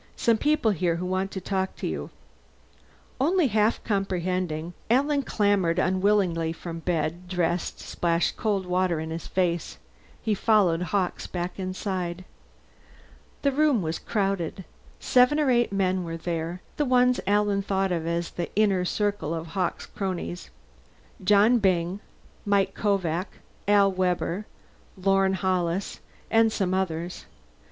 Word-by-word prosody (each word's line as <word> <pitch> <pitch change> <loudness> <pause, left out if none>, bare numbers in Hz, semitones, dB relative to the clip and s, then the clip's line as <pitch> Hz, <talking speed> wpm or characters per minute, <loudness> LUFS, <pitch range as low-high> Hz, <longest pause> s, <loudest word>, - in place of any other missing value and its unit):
Some 230 -2 +2
people 295 -6 +2
here 175 -3 0
who 175 +2 -4
want 185 +1 -1
to 195 - -5
talk 190 0 -2
to - - -6
you." - - -3 1.1
Only 320 +2 +3
half 215 +1 +2
comprehending, 180 -4 -1 0.2
Alan 280 +4 +3
clambered 200 -8 +1
unwillingly 185 -3 +2
from 165 0 -7
bed, 165 +1 -2
dressed, 175 -1 -1
and - - -12
splashed 170 -1 0
cold 200 -4 -1
water 180 -2 +1
in 160 0 -5
his 165 +1 -5
face. 175 -3 -1 0.4
He 220 - 0
followed 195 -5 +3
Hawkes 180 0 -1
back 175 +1 -4
inside. 185 -1 -3 1.2
The 280 - +3
living 275 - -4
room 285 -8 +3
was 160 0 -2
crowded. 195 -4 -2 0.3
Seven 255 +4 +4
or 290 -4 +3
eight 240 -3 +2
men 190 -2 +1
were 165 -1 -5
there 170 +1 -4
the 295 - +1
ones 250 -1 +3
Alan 205 0 +2
thought 195 -1 0
of 165 -2 -1
as 170 0 -1
the 175 - -4
inner 200 -3 +3
circle 205 -4 -1
of 165 0 -6
Hawkes' 180 +1 -2
cronies. 185 -2 -4 0.7
Johnny 210 +5 +5
Byng, 185 -1 +1 0.4
Mike 200 -1 +2
Kovak, 185 -3 0 0.4
Al 200 -1 +5
Webber, 185 +1 -1 0.5
Lorne 195 0 +2
Hollis, 185 0 -1 0.3
and 225 0 +4
some 190 -4 0
others. 175 -2 -2
190 Hz, 140 wpm, -26 LUFS, 175-205 Hz, 1.2 s, Johnny